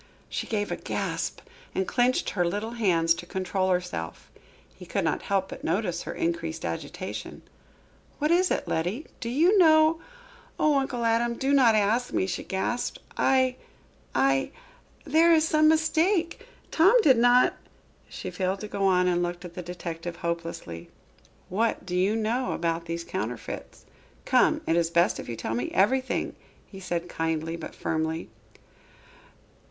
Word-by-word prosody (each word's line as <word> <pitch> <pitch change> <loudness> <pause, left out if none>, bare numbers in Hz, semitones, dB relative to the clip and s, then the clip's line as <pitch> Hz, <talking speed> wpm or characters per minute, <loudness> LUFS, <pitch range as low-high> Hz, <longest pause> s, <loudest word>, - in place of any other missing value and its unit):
She - - -4
gave 205 -2 -2
a - - -2
gasp - - -3 0.3
and 190 - 0
clenched 250 +1 +1
her 180 - +1
little 205 +6 -2
hands 175 -8 +2
to 170 +1 -8
control 190 +1 -1
herself. 180 - -3 0.4
He - - -13
could - - -1
not - - 0
help 195 -1 -1
but - - -9
notice 175 0 -1
her - - -6
increased 335 -1 -2
agitation. - - -6 0.7
"What 300 +2 0
is 360 +1 +4
it, - - -1
Letty? 180 - -2
Do 235 - -4
you 340 - +4
know 315 -1 +5 0.3
" - - -25
"Oh, 295 -2 +4
Uncle 250 -3 -2
Adam, 235 +1 +2
do 270 +3 0
not 250 -5 +5
ask 220 +4 +1
me," - - +1
she 180 -1 -3
gasped. 195 +6 -2 0.2
"I 260 -1 +2 0.6
I 135 0 +2 0.6
there 330 +2 +4
is 320 -1 +4
some 310 -1 +4
mistake 330 +5 +1 0.2
Tom 390 +10 +5
did 260 -5 +5
not 245 +1 +5 0.3
" - - -33
she - - -6
failed 190 0 -2
to 210 - -5
go 200 -1 0
on 180 -1 +3
and 175 -1 +2
looked 175 +1 -3
at 175 - -9
the 180 - -6
detective 170 -1 -6
hopelessly. 170 - -5 0.6
"What 220 +5 -1
do 180 -1 -4
you 190 +4 +2
know 225 +4 -1
about 165 0 -2
these 170 0 -3
counterfeits? 115 -5 -6 0.4
Come, - - +3
it 165 - +1
is 170 -1 +2
best 170 +1 +2
that - - -7
you 120 - -4
tell 110 - -4
me 120 +2 -2
everything," 255 +7 +1 0.3
he 195 - -12
continued 175 -2 -3
kindly, 165 -1 -2
but 165 - -8
firmly. 160 +1 -2
195 Hz, 160 wpm, -27 LUFS, 170-260 Hz, 0.7 s, know